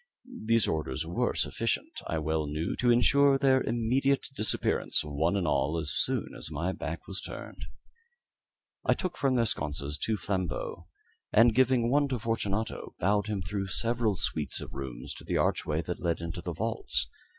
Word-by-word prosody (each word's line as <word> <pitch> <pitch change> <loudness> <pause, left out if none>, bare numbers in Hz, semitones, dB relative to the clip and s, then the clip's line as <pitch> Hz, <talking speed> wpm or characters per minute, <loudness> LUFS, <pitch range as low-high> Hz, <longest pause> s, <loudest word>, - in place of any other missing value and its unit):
These 115 -1 +4
orders 80 0 -2
were 85 +2 -1
sufficient, - - -1
I 80 - -1
well 80 0 -1
knew, 75 +3 -2
to 125 - +2
insure 140 +3 +5
their 135 -1 +3
immediate 125 +4 +1
disappearance, 110 -7 +1
one 75 +5 0
and 95 - -1
all, 75 +2 +1
as 75 -2 +5
soon - - +5
as - - +1
my 80 +4 -2
back 80 -3 -6
was 95 -2 -3
turned. - - -8 1.2
I - - +3
took 180 -1 -3
from 135 -2 +1
their 120 -2 +3
sconces 75 -7 -2
two 110 -1 0
flambeaux, 95 -7 -3 0.4
and 115 +1 +6
giving 125 -1 +3
one 145 +1 +3
to 130 -2 -2
Fortunato, 110 -1 -3
bowed 100 +2 +1
him 105 -3 -2
through 95 +2 -3
several 115 +1 0
suites - - -1
of - - -8
rooms 65 -2 -6
to - - -13
the - - -1
archway 75 +2 0
that 90 - -4
led 85 -2 0
into 85 +1 -5
the 85 - -4
vaults. 115 +5 0
100 Hz, 170 wpm, -29 LUFS, 80-120 Hz, 1.2 s, and